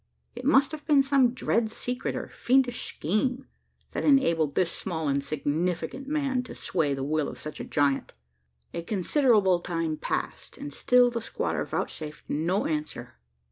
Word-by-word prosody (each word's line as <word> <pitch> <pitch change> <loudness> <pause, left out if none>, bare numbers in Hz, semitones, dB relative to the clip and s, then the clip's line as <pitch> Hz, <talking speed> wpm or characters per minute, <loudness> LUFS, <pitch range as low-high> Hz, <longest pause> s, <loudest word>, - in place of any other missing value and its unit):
It 245 +1 -7
must 275 0 +5
have 310 -1 -7
been 290 -3 +5
some 270 -3 +4
dread 230 -3 +1
secret, 245 +2 -3
or - - -4
fiendish 250 -1 +1
scheme, 250 - -1 0.5
that - - -3
enabled 165 - +3
this 175 -2 +2
small 160 -5 -3
insignificant 155 - -1
man 280 -4 0
to - - -9
sway 150 -6 0
the 135 - -4
will 155 +1 0
of - - -9
such 150 - -6
a - - -4
giant! 140 -2 +1 0.6
A 170 - -3
considerable 205 - +3
time 165 -3 -2
passed, - - -4
and 145 - -7
still 250 +6 +4
the 235 -1 -3
squatter - - -2
vouchsafed 150 -1 -5
no 170 +7 0
answer. 150 - -4
185 Hz, 155 wpm, -27 LUFS, 155-255 Hz, 0.6 s, must